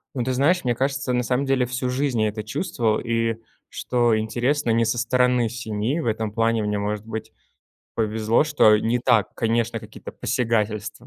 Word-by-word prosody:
Ну, 125 - -1
ты 130 +1 -1
знаешь, 155 +8 +2
мне 120 -2 0
кажется, 135 0 -1
на 125 0 +1
самом 125 +3 0
деле 135 -2 +2
всю 125 +1 -3
жизнь 130 -2 0
я 110 - +2
это 105 0 -6
чувствовал, 120 - -1
и, 115 -1 -1 0.3
что 120 -3 +1
интересно, 120 +5 -1
не 115 +1 +2
со 115 +2 0
стороны 125 0 +2
семьи- 115 +4 -2
в - - -4
этом 110 -1 -1
плане 115 0 +1
мне, 105 0 -1
может 105 +1 -3
быть, 110 0 -6 0.6
повезло, 110 +3 +1
что, 145 -8 +5
э, - - -2
не 115 +3 +1
так, 120 -4 +2
конечно, 115 0 0
какие-то - - -10
посягательства 110 -4 -2
115 Hz, 185 wpm, -23 LUFS, 110-125 Hz, 0.6 s, что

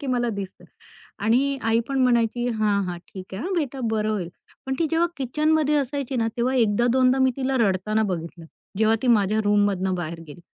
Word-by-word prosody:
की 280 - -6
मला 245 -2 0
दिसतं 195 -1 -7 0.6
आणि 270 +5 +2
आई 225 +1 +2
पण 270 -1 -1
म्हणायची 240 -1 +1
"हां, 210 -3 +1
हां, 175 - -4
ठीक 190 -1 -9
आहे. 190 - -5
हां 380 - -2
बेटा, 280 -5 -2
बरं 215 -1 0
होईल." 185 -5 -3 0.4
पण 265 - -2
ती 330 - +2
जेव्हा 330 +1 +2
किचनमध्ये 300 +3 +1
असायची 275 -1 -2
ना, 230 -2 +1
तेव्हा 255 +2 +1
एकदा 235 0 +2
दोनदा 260 0 +3
मी 260 -1 +4
तिला 265 0 0
रडताना 215 0 +1
बघितलं. 170 -3 -5 0.3
जेव्हा 220 +1 +3
ती - - +1
माझ्या 215 -2 +3
रूममधनं 205 -2 +1
बाहेर 170 -1 -5
गेली 150 +4 -12
230 Hz, 195 wpm, -24 LUFS, 205-265 Hz, 0.6 s, मी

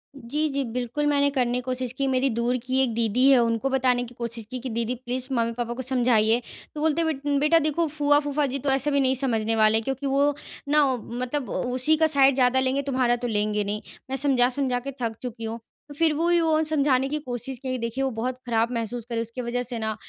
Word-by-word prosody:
जी, 285 +4 -2
जी 280 0 -1
बिल्कुल 250 +4 -2
मैंने 285 -1 +3
करने 250 -3 0
की - - -2
कोशिश 255 -1 -3
की। 275 +1 -2
मेरी 265 +1 +2
दूर 235 +1 0
की 260 +1 0
एक 240 -4 -1
दीदी 235 +3 +3
है 270 -2 +6
उनको 230 +3 0
बताने 255 -2 +2
की 245 0 -10
कोशिश 235 -1 -5
की 255 - -4
कि 255 +1 -5
दीदी 235 +1 -2
प्लीज़ 250 +1 -5
मम्मी-पापा 235 0 -1
को 260 - -5
समझाइए। 240 -3 +2 0.3
तो - - -5
बोलते 320 +1 +2
हैं 330 - 0
बेट 285 0 0
बेटा 305 +3 +4
देखो 310 +2 0
फूआ-फूफा 290 0 +2
जी 275 - -2
तो 275 - -2
ऐसे 270 +2 +1
भी 280 - +2
नहीं 265 -1 +2
समझने 225 -4 0
वाले। 220 0 +4
क्योंकि 270 +3 -4
वो 280 +2 +2 0.4
ना 300 0 +5
मतलब 250 +3 -4
उसी 255 +5 +1
का 320 0 +4
साइड 275 -3 +4
ज़्यादा 255 0 +3
लेंगे 265 +1 +1
तुम्हारा 255 -3 +1
तो 245 0 -4
लेंगे 210 -1 0
नहीं। 205 +1 -3 0.3
मैं 265 - -2
समझा-समझा 255 -1 +1
के 275 +3 -6
थक 225 -2 -2
चुकी 235 -2 -6
हूँ। 225 +1 -4 0.4
फिर 325 -1 +3
वो 325 +3 0
ही 345 0 +4
वो 315 -1 +2
समझाने 275 -4 +2
की 300 +1 -2
कोशिश 255 -1 -6
की 255 0 -3
देखिए 235 +3 -2
वो 270 - +1
बहुत 250 +2 -3
खराब 230 0 +1
महसूस 230 0 -3
कर 235 - -3
रही 230 - 0
उसकी 230 +2 -6
वजह 245 +1 -2
से 245 0 -5
ना 220 -1 -2
255 Hz, 230 wpm, -25 LUFS, 235-280 Hz, 0.4 s, है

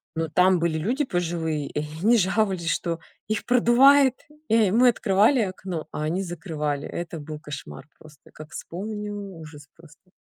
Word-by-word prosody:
но 165 0 -1
там 180 +3 +3
были 165 -1 0
люди 245 - 0
пожилые, 165 - -2
и - - -4 0.2
они 235 +2 +5
жаловались, 190 -3 +1
что 165 0 -1 0.3
их 215 -1 -2
продувает. 260 +3 +5 0.3
И 220 -3 +4
мы 245 +5 +5
открывали 225 +3 +3
окно, 185 -4 -4
а 150 - -4
они 170 +5 -1
закрывали. 155 -5 -4
Это 170 -1 -6
был 150 +1 -8
кошмар 140 - -9
просто, 155 -2 -18
как 155 0 -12
вспомню 210 +3 -6
ужас 160 -7 -10
просто. 165 +2 -20
175 Hz, 150 wpm, -24 LUFS, 155-215 Hz, 0.3 s, они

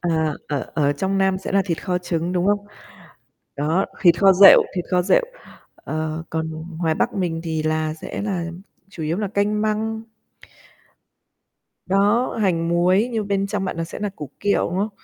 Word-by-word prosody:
À, 160 -3 0
ở 145 -3 -3
ở 145 -2 +2
trong 195 +4 -1
Nam 190 -1 +2
sẽ 190 - -6
là 195 -1 +3
thịt 170 -3 -3
kho 180 -2 0
trứng, 175 0 -2
đúng 180 +1 0
không? 205 0 +1 0.9
Đó, 160 +7 +1 0.2
thịt 170 -2 +5
kho 195 -1 +6
rệu, 195 +2 +8
thịt 180 - -2
kho 180 0 +3
rệu, - - +3 0.6
ờ, 155 +1 -4
còn 160 0 -2 0.3
ngoài 160 -2 +1
Bắc 240 +6 -1
mình 175 -5 -2
thì 160 -1 -2
là, 155 0 -1
sẽ 160 - -6
là 190 -5 -2 0.4
chủ 180 -5 -8
yếu 160 +3 -1
là 205 -2 -2
canh 210 +1 0
măng. 220 +1 -1 1.8
Đó, 205 +6 +2
hành 170 -4 +1
muối 185 +7 +2
nhưng 215 -3 -2
bên 200 0 0
trong 200 -1 -2
bạn 170 - -4
nó 165 - -1
sẽ 165 - -8
nà 205 -1 -2
củ 150 -4 -7
kiệu, 200 -3 +1
đúng 180 - -3
không? 210 - 0
180 Hz, 190 wpm, -22 LUFS, 165-200 Hz, 1.8 s, rệu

